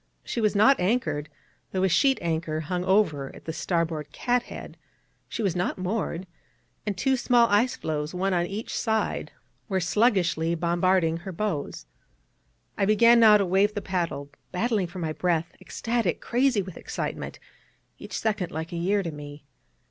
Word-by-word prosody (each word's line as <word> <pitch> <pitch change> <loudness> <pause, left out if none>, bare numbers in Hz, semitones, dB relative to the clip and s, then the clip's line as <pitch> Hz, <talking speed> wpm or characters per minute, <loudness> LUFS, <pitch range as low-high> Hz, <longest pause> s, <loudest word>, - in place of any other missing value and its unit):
She 235 - -3
was 215 -1 +2
not 240 +7 +5
anchored, 170 - 0 0.4
though 190 -1 0
a - - +5
sheet 270 - +3
anchor 160 -2 -1
hung 180 +3 -2
over 175 -9 +1
at - - -14
the 160 - -4
starboard 165 -3 -2
cathead; 245 -1 -2 0.5
she 230 - -3
was 190 -4 0
not 180 0 -1
moored; 185 -1 -2 0.6
and 200 -3 -1
two 265 +6 +2
small 240 -2 +4
ice 240 +7 +3
floes, 150 - -3
one 190 +1 -1
on 175 -1 +1
each 205 +4 -5
side, 220 -2 -1 0.4
were 190 -1 +1
sluggishly 175 -4 +2
bombarding 170 0 +2
her 190 +3 -7
bows. 170 - -3 0.9
I - - +3
began 230 +3 +6
now 215 -2 +8
to 200 - +1
wave 195 +4 +2
the 205 - -2
paddle, 170 -7 -2 0.2
battling 205 0 0
for 175 +2 -10
my 160 -3 -2
breath, 170 -1 0
ecstatic, 230 -7 -1
crazy 245 -4 +1
with 185 -2 -9
excitement, - - -5 0.6
each - - -6
second 210 -5 -1
like 160 +1 -5
a 170 - -4
year 195 +4 +1
to 170 - -3
me. 145 -1 -10
185 Hz, 165 wpm, -26 LUFS, 165-215 Hz, 0.9 s, now